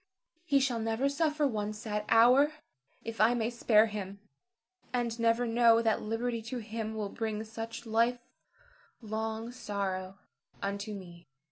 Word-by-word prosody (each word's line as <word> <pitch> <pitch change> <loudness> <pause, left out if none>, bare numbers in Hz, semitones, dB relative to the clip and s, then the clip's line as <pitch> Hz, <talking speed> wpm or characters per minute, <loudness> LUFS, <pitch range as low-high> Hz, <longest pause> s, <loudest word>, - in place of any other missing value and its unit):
He 285 -5 +4
shall 260 -4 0
never 225 +4 0
suffer 300 +1 +1
one 215 -5 -1
sad 210 -1 -4
hour 250 +6 +6 0.5
if 230 -1 -4
I 230 +3 +5
may 230 0 -1
spare 225 -2 +4
him, 200 -2 -6 0.7
and 240 -2 -1
never 230 +1 +2
know 230 0 +4
that 220 -1 +2
liberty 230 +2 -2
to 225 +3 -5
him 220 -1 -5
will 210 -2 -3
bring 220 0 -3
such 225 +2 -7
life 230 +2 +2 0.9
long 220 +1 -3
sorrow 195 -5 -4 0.4
unto 200 +1 -3
me. 175 -3 -11
225 Hz, 140 wpm, -31 LUFS, 210-240 Hz, 0.9 s, hour